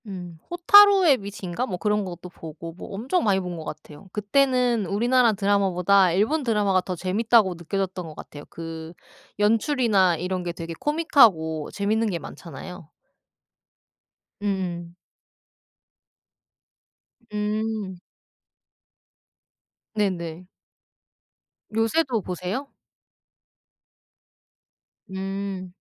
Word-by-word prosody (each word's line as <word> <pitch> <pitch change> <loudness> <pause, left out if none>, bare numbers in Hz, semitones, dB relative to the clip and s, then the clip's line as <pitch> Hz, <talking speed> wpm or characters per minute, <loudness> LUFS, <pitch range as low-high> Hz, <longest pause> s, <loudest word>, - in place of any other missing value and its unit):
음 180 -4 -8
호타루의 370 -3 +7
빛인가 200 +2 -5
뭐 180 - -4
그런 210 +1 0
것도 180 0 -8
보고 165 -1 -9
뭐 180 - -10
엄청 255 - -1
많이 200 -3 +2
본 180 -1 -5
것 165 -2 -6
같아요. 150 +6 -10
그때는 245 +1 +2
우리나라 235 +4 +3
드라마보다 195 -2 +3
일본 225 - +1
드라마가 210 -5 +2
더 185 0 -5
재밌다고 200 +2 +2
느껴졌던 185 +1 -3
것 155 - -10
같아요. 145 -1 -10
그 165 0 -8 0.5
연출이나 215 - +3
이런 180 +3 -3
게 175 -1 -4
되게 165 0 -6
코믹하고 215 - +3
재밌는 215 +2 0
게 180 - -2
많잖아요. 180 0 -10 1.5
음음. 180 -4 -3 2.4
음. 210 -2 -2 2.0
네네. 180 -5 -2 1.3
요새도 225 +2 +1
보세요? 185 +10 -5 2.4
음. 190 -1 -5
195 Hz, 210 characters per minute, -24 LUFS, 180-225 Hz, 2.4 s, 호타루의